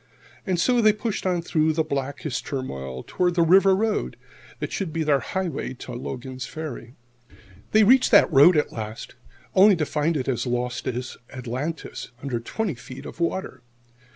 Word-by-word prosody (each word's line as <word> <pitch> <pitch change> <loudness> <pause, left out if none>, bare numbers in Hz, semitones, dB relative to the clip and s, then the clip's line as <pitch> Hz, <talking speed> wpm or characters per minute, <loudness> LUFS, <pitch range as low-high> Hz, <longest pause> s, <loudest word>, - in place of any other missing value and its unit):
And 180 -2 0
so 245 +6 +3
they 215 -1 +5
pushed 210 -2 -3
on 175 -2 0
through 155 -2 +1
blackest 140 -3 -2
turmoil 65 - -5
toward 180 -1 0
the 170 - +4
river 190 +3 +6
road 215 +2 -1 0.4
that - - -5
should 190 -5 -3
be 165 0 -1
their 145 -2 +3
highway 180 -8 -3
to 125 - -9
Logan's 130 +1 -6
Ferry. 140 -6 -7 0.8
They 215 0 +6
reached 255 +5 +5
that - - +5
road 150 +5 +7
at 150 - +1
last, 110 0 -7 0.4
only 195 +1 +7
to 160 -3 -1
find 155 +2 0
it 130 - -3
as 130 -1 -1
lost 125 0 -2
as 125 +1 -4
Atlantis,[70 130 +6 -5
2] 120 - -29
under 130 -4 -2
twenty 195 - -3
feet 130 +2 -10
of - - -9
water! 170 -6 -2
150 Hz, 170 wpm, -24 LUFS, 130-185 Hz, 0.8 s, road